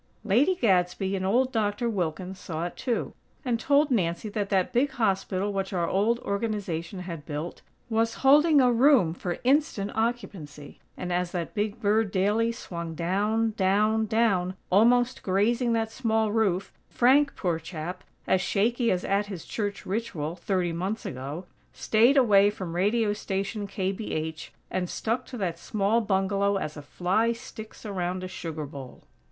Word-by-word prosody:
Lady 245 Hz, -, +3 dB
Gadsby 190 Hz, -, +1 dB
and 190 Hz, -, -2 dB
old 255 Hz, +6 st, +2 dB
Doctor 220 Hz, 0 st, 0 dB
Wilkins 185 Hz, -2 st, -3 dB
saw 165 Hz, 0 st, -4 dB
it, 175 Hz, -, -6 dB
too, 245 Hz, -3 st, -2 dB, 0.3 s
and 240 Hz, -3 st, 0 dB
told 285 Hz, +2 st, +3 dB
Nancy 175 Hz, -2 st, 0 dB
that 205 Hz, -1 st, -3 dB
that 190 Hz, -3 st, +1 dB
big 255 Hz, +4 st, +3 dB
hospital 195 Hz, -3 st, -1 dB
which 195 Hz, 0 st, -2 dB
our 170 Hz, -2 st, 0 dB
old 210 Hz, +6 st, +2 dB
Organization 200 Hz, -4 st, -3 dB
had 170 Hz, -4 st, -7 dB
built, 150 Hz, +3 st, -5 dB, 0.3 s
was 225 Hz, 0 st, 0 dB
holding 295 Hz, +2 st, +6 dB
a 250 Hz, -2 st, +5 dB
room 240 Hz, -, +4 dB
for 175 Hz, 0 st, -4 dB
instant 260 Hz, -6 st, +1 dB
occupancy; 195 Hz, -11 st, -4 dB, 0.2 s
and, 180 Hz, -1 st, -3 dB
as 180 Hz, 0 st, -1 dB
that 170 Hz, -2 st, -3 dB
big 210 Hz, +1 st, -2 dB
bird 210 Hz, +1 st, +2 dB
daily 210 Hz, +4 st, +1 dB
swung 170 Hz, -7 st, -6 dB
down, 210 Hz, +7 st, 0 dB
down, 215 Hz, +3 st, +2 dB
down, 200 Hz, -5 st, +1 dB, 0.2 s
almost 245 Hz, +5 st, +4 dB
grazing 230 Hz, +5 st, +1 dB
that 225 Hz, -1 st, 0 dB
small 220 Hz, -3 st, 0 dB
roof, 200 Hz, -4 st, 0 dB, 0.2 s
Frank, 275 Hz, +4 st, +4 dB
poor 175 Hz, -4 st, -1 dB
chap, 170 Hz, +3 st, -6 dB, 0.2 s
as 185 Hz, -, +2 dB
shaky 230 Hz, +5 st, +1 dB
as 180 Hz, 0 st, 0 dB
at 200 Hz, +1 st, +1 dB
his 190 Hz, -5 st, -7 dB
church 205 Hz, -3 st, -4 dB
ritual, 180 Hz, -7 st, -3 dB
thirty 180 Hz, -2 st, -1 dB
months 190 Hz, +6 st, -3 dB
ago, 140 Hz, +7 st, -5 dB, 0.3 s
staid 235 Hz, +6 st, +3 dB
away 205 Hz, -6 st, +6 dB
from 185 Hz, -5 st, -6 dB
Radio 205 Hz, +3 st, +2 dB
Station 200 Hz, +1 st, -3 dB
KBH, 185 Hz, -5 st, -3 dB, 0.2 s
and 180 Hz, -1 st, -2 dB
stuck 230 Hz, +3 st, -2 dB
to 250 Hz, -, -7 dB
that 175 Hz, -5 st, -2 dB
small 210 Hz, +5 st, +1 dB
bungalow 200 Hz, 0 st, +1 dB
as 155 Hz, -5 st, -4 dB
a 150 Hz, -, -7 dB
fly 185 Hz, +10 st, 0 dB
sticks 220 Hz, -1 st, -11 dB
around 185 Hz, -2 st, -3 dB
a -, -, -3 dB
sugar 165 Hz, -4 st, -5 dB
bowl. 135 Hz, -2 st, -10 dB
200 Hz, 160 wpm, -27 LUFS, 180-225 Hz, 0.3 s, holding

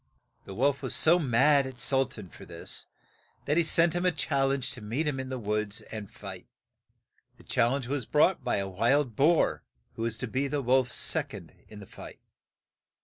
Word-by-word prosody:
The 95 Hz, -, -9 dB
wolf 140 Hz, +4 st, +1 dB
was 130 Hz, -4 st, 0 dB
so 170 Hz, +3 st, +5 dB
mad 140 Hz, 0 st, +3 dB
at 130 Hz, -2 st, -10 dB
Sul 135 Hz, +1 st, +2 dB
tan 105 Hz, -7 st, -10 dB
for -, -, -13 dB
this -, -, -5 dB, 0.6 s
that 145 Hz, -, +1 dB
he 170 Hz, -, +4 dB
sent 165 Hz, 0 st, +3 dB
him 175 Hz, +1 st, -1 dB
a 180 Hz, -, +3 dB
chal 140 Hz, -3 st, 0 dB
lenge 135 Hz, -1 st, -1 dB
to 125 Hz, -4 st, -9 dB
meet 115 Hz, +10 st, -2 dB
him 145 Hz, -3 st, -1 dB
in 130 Hz, 0 st, -5 dB
the 130 Hz, -, -3 dB
woods 105 Hz, -1 st, -2 dB
and 110 Hz, -3 st, -6 dB
fight. -, -, -10 dB, 0.9 s
The -, -, -18 dB
chal 120 Hz, +2 st, +1 dB
lenge 140 Hz, -2 st, -2 dB
was 135 Hz, 0 st, -3 dB
brought 160 Hz, +5 st, +3 dB
by -, -, 0 dB
a 100 Hz, -1 st, -2 dB
wild 120 Hz, +6 st, +1 dB
boar, 160 Hz, +6 st, +3 dB, 0.3 s
who -, -, -8 dB
was 115 Hz, -1 st, -1 dB
to 125 Hz, -, -3 dB
be 130 Hz, +5 st, -1 dB
the 145 Hz, 0 st, -2 dB
wolf's 125 Hz, 0 st, +2 dB
sec -, -, 0 dB
ond -, -, -11 dB
in 105 Hz, -1 st, -11 dB
the -, -, -10 dB
fight. -, -, -12 dB
130 Hz, 205 wpm, -28 LUFS, 115-145 Hz, 0.9 s, so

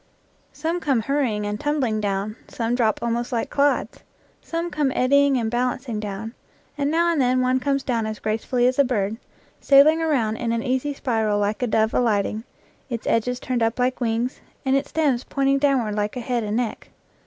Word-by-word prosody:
Some 325 Hz, +4 st, -2 dB
come 275 Hz, -8 st, +1 dB
hurrying 235 Hz, -5 st, 0 dB
and 210 Hz, 0 st, -3 dB
tumbling 275 Hz, -8 st, 0 dB
down; 200 Hz, +1 st, -2 dB
some 230 Hz, 0 st, -2 dB
drop 230 Hz, -3 st, +1 dB
almost 235 Hz, +1 st, -1 dB
like 235 Hz, -2 st, -2 dB
clods; 285 Hz, 0 st, +1 dB, 0.4 s
some 335 Hz, +1 st, -4 dB
come 295 Hz, -3 st, 0 dB
eddying 280 Hz, +1 st, +4 dB
and 225 Hz, -2 st, -1 dB
bal 250 Hz, +1 st, +1 dB
ancing 240 Hz, -4 st, -6 dB
down; 210 Hz, +2 st, -5 dB, 0.4 s
and 285 Hz, -1 st, 0 dB
now 340 Hz, +2 st, +2 dB
and 315 Hz, -4 st, +1 dB
then 255 Hz, 0 st, +2 dB
one 255 Hz, +1 st, +2 dB
comes 275 Hz, +1 st, 0 dB
down 230 Hz, -4 st, -1 dB
as 215 Hz, 0 st, -4 dB
gracefully 225 Hz, +4 st, -1 dB
as 255 Hz, +2 st, +1 dB
a -, -, +7 dB
bird, 220 Hz, -4 st, -1 dB, 0.4 s
sailing 295 Hz, +4 st, +5 dB
around 245 Hz, -9 st, +1 dB
in 235 Hz, -1 st, -2 dB
an 230 Hz, 0 st, -1 dB
easy 260 Hz, +2 st, -1 dB
spiral 220 Hz, -6 st, 0 dB
like 205 Hz, +2 st, -1 dB
a 250 Hz, -, +1 dB
dove 220 Hz, 0 st, +1 dB
alighting, 215 Hz, -2 st, +1 dB, 0.5 s
its 235 Hz, -3 st, -4 dB
edges 245 Hz, +2 st, 0 dB
turned 255 Hz, -2 st, -2 dB
up 225 Hz, 0 st, +1 dB
like 250 Hz, +1 st, 0 dB
wings, 235 Hz, +2 st, -1 dB, 0.2 s
and 265 Hz, 0 st, +3 dB
its 275 Hz, +1 st, 0 dB
stems 280 Hz, -6 st, +1 dB
pointing 275 Hz, 0 st, +1 dB
downward 265 Hz, -7 st, +1 dB
like 210 Hz, +3 st, -2 dB
a -, -, -2 dB
head 240 Hz, -1 st, -1 dB
and 210 Hz, +1 st, -2 dB
neck. 240 Hz, -3 st, -3 dB
245 Hz, 195 wpm, -23 LUFS, 220-275 Hz, 0.5 s, a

